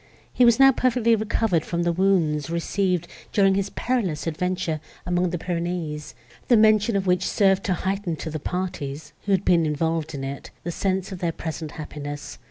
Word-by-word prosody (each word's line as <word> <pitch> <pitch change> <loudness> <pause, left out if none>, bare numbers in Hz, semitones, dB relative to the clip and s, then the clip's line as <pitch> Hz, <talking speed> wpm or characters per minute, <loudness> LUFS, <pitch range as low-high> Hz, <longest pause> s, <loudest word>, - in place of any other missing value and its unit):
He 250 - +5
was 235 0 +5
now 270 0 +8
perfectly 245 -3 +2
recovered 210 -5 0
from 170 0 -2
the 175 - +2
wounds, 170 -5 +1
received, 175 +1 0 0.2
during 195 -2 +4
his 195 0 0
perilous 210 -12 -1
adventure 170 0 -1 0.3
among 180 +1 +1
the 175 - -2
Pyrenees, 170 -3 -3 0.3
the 240 - +6
mention 215 0 +4
of 195 -1 0
which 180 -1 +2
served 195 -1 +3
to 185 - +1
heighten 190 -1 -2
to 160 +1 -6
the 155 - -3
parties, 150 -4 -4
who 205 - -1
had 190 -2 +2
been 170 -2 +4
involved 160 0 -1
in 135 - -5
it, 135 +1 -6
the 175 - -3
sense 190 +2 -1
of 185 - -6
their 170 -2 0
present 160 -2 -6
happiness. 145 -1 -7
180 Hz, 180 wpm, -24 LUFS, 160-195 Hz, 0.3 s, now